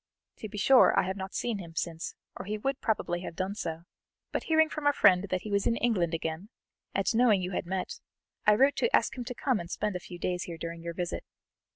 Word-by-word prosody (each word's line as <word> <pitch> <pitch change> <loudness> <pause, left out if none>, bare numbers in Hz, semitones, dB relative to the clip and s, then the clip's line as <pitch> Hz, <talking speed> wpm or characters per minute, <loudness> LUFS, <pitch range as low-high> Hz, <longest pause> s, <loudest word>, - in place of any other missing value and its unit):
To 215 - -7
be 210 - -8
sure, 260 +5 +6
I - - +3
have 190 +1 -2
not 190 -1 -6
seen 230 -4 -1
him 170 -3 -9
since, 165 -1 -3 0.2
or - - -7
he 210 +2 -2
would 270 +5 -2
probably 175 -6 0
have 175 - -7
done 185 +3 -2
so, 165 -5 -4 0.5
but - - -2
hearing 315 0 +4
from 305 -2 -3
a 290 - +5
friend 185 -6 +5
that 185 -1 -1
he 210 - -7
was 200 0 +1
in 230 - +2
England 185 -9 +1
again, 160 +5 -4 0.5
and - - +1
knowing 225 -5 +4
you 180 - -3
had 180 - -3
met, 190 0 -3 0.5
I 210 - +7
wrote 270 +5 +4
to 475 - +3
ask - - +1
him 245 -2 -5
to 250 0 -5
come 260 -3 +1
and 170 -1 -7
spend 205 +2 -2
a - - -1
few 175 0 -10
days 180 0 -2
here 170 -2 -7
during 165 0 -6
your 170 0 -5
visit. 175 -1 -3
190 Hz, 245 wpm, -29 LUFS, 175-230 Hz, 0.5 s, I